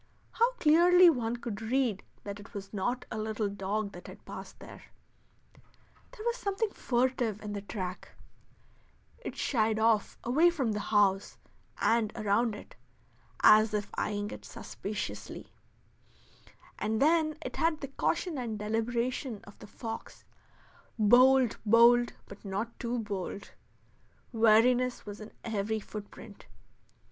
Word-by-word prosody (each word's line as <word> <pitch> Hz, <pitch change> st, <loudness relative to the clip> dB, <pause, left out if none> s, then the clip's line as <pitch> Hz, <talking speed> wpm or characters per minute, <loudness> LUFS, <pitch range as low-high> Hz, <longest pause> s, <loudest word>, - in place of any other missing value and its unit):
How 470 Hz, +2 st, +2 dB
clearly 350 Hz, -2 st, +6 dB
one 240 Hz, -4 st, -2 dB
could 230 Hz, -3 st, -6 dB
read 230 Hz, -3 st, 0 dB, 0.2 s
that 200 Hz, 0 st, -6 dB
it 205 Hz, -, -14 dB
was 195 Hz, 0 st, -7 dB
not 245 Hz, +6 st, -2 dB
a 220 Hz, -, -3 dB
little 215 Hz, 0 st, -2 dB
dog 200 Hz, +1 st, -3 dB
that 175 Hz, -2 st, -11 dB
had -, -, -13 dB
passed -, -, -9 dB
there. -, -, -12 dB, 1.2 s
There 430 Hz, -, -11 dB
was 475 Hz, +1 st, 0 dB
something 400 Hz, +1 st, -2 dB
furtive 245 Hz, -, 0 dB
in 210 Hz, -1 st, -5 dB
the 200 Hz, -, -4 dB
track; 185 Hz, -3 st, -6 dB, 1.1 s
it -, -, -7 dB
shied 220 Hz, -4 st, +1 dB
off 220 Hz, -1 st, +2 dB
away 300 Hz, +9 st, +4 dB
from 275 Hz, -10 st, -1 dB
the 210 Hz, -, -2 dB
house 205 Hz, -2 st, +1 dB, 0.4 s
and 225 Hz, -2 st, +2 dB
around 215 Hz, +2 st, +1 dB
it, -, -, -12 dB, 0.7 s
as 215 Hz, 0 st, +6 dB
if 205 Hz, -1 st, -3 dB
eying 205 Hz, 0 st, -2 dB
it -, -, -9 dB
suspiciously; 205 Hz, +2 st, -7 dB, 1.3 s
and 220 Hz, +1 st, -1 dB
then 310 Hz, +1 st, +3 dB
it -, -, -5 dB
had 320 Hz, -1 st, +1 dB
the 275 Hz, -, -4 dB
caution 330 Hz, +2 st, -1 dB
and 230 Hz, -4 st, -3 dB
deliberation 235 Hz, +2 st, -2 dB
of 205 Hz, -, -15 dB
the -, -, -11 dB
fox 225 Hz, +1 st, -8 dB, 0.7 s
bold, 250 Hz, +3 st, +5 dB
bold, 235 Hz, +2 st, +5 dB
but 200 Hz, -, -13 dB
not 210 Hz, +4 st, -4 dB
too 240 Hz, 0 st, -2 dB
bold; 200 Hz, -3 st, -5 dB, 0.8 s
wariness 240 Hz, +2 st, +3 dB
was 205 Hz, 0 st, -8 dB
in 215 Hz, -, -9 dB
every 220 Hz, -1 st, -1 dB
footprint. 210 Hz, 0 st, -10 dB
225 Hz, 135 wpm, -30 LUFS, 210-255 Hz, 1.3 s, clearly